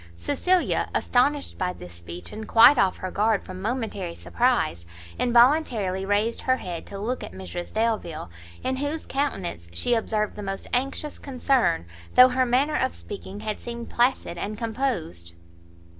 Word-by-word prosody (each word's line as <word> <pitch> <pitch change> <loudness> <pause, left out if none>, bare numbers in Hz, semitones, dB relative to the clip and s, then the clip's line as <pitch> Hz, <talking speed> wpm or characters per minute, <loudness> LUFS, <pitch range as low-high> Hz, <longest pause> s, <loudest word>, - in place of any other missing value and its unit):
Cecilia, 355 - +1
astonished 280 +3 +1
by 180 -1 0
this 90 - -11
speech, 85 +1 -8
and 220 0 -7
quite 235 +5 +7
off 190 -2 +3
her 185 - -5
guard 215 0 +1
from 185 0 -8
momentary 210 -6 -3
surprize, 240 - 0 0.4
involuntarily 235 -7 +3
raised 210 +3 +1
her 255 0 +2
head 175 -7 -6
to 200 - -7
look 235 +6 -3
at - - -8
Mrs 180 -2 -7
Delvile, 215 - -1 0.3
in 260 0 -1
whose 290 +3 -2
countenance 190 - -2
she 85 - +2
observed 215 -2 0
the 210 - -6
most 195 -1 -4
anxious 275 +4 -1
concern, 255 - +1 0.3
though 255 0 +9
her 255 0 +1
manner 275 +5 +2
of 260 - 0
speaking 200 0 -8
had 215 -1 -3
seemed 235 -1 -7
placid 240 -8 +1
and 210 +3 -4
composed. 220 - -3
220 Hz, 155 wpm, -25 LUFS, 185-255 Hz, 0.4 s, though